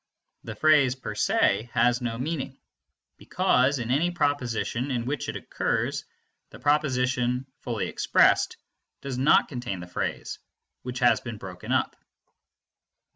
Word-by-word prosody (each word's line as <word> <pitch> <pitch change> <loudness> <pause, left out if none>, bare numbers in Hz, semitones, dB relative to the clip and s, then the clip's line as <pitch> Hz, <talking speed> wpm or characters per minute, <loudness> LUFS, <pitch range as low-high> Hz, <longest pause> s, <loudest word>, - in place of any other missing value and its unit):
The - - -7
phrase 150 -5 +4
per 130 - -6
se 105 +5 +1
has 120 +1 +3
no 115 -2 -3
meaning, 135 0 -4 0.6
because 130 +3 +2
in 120 -1 -3
any 155 +7 +2
proposition 135 -5 -1
in 120 -3 -2
which 140 +3 -3
it - - -4
occurs - - -2 0.4
the - - -12
proposition, 130 -3 +1
fully 115 -5 -3
expressed, - - +3 0.4
does 135 -2 -4
not 135 +4 +5
contain 120 -8 -5
the 90 - -7
phrase, 90 - -4 0.4
which 125 0 -6
has 120 - +4
been 120 -3 -6
broken 90 -3 -8
up. - - +1
125 Hz, 130 wpm, -26 LUFS, 120-140 Hz, 0.6 s, not